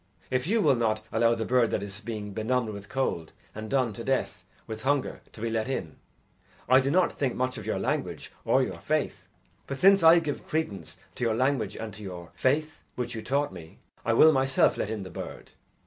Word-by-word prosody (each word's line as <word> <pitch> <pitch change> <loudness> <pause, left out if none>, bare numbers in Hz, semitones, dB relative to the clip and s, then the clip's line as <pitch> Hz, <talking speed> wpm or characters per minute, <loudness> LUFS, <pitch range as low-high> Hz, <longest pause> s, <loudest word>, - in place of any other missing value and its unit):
If 130 +3 0
you 220 +3 +2
will 145 -4 +5
not 110 -3 0
allow 115 +1 +3
the 110 -1 -3
bird 125 -2 +3
that 100 - -1
is 100 +1 -7
being 105 -3 -5
benumbed 115 +2 0
with 100 -1 -8
cold, 85 -12 -2 0.2
and 110 0 -7
done 130 -5 +1
to 115 - -7
death 135 +2 -1 0.2
with 110 0 -6
hunger, 140 +1 0
to 110 - -12
be 115 0 -1
let 110 0 -1
in, 95 -12 -4 0.7
I 130 +1 +7
do 135 +1 0
not 180 +4 +3
think 135 -3 -1
much 130 0 -1
of - - -9
your - - 0
language - - -2
or - - +3
your - - -4
faith. - - -2 0.4
But 140 - -4
since 195 +1 +6
I 165 +1 +8
give 155 -4 -2
credence 155 -11 -3 0.2
to - - -5
your 115 -2 +2
language 130 +1 0
and 110 -2 -6
to 105 - -11
your 90 -4 -8
faith, 150 +3 0
which 120 -1 -3
you 110 - -5
taught 140 +1 0
me, 80 -3 -11 0.3
I 115 - +1
will 155 +7 +7
myself 135 -1 +3
let - - -2
in 110 -3 -3
the 95 - -9
bird." - - -8
120 Hz, 215 wpm, -28 LUFS, 110-135 Hz, 0.7 s, I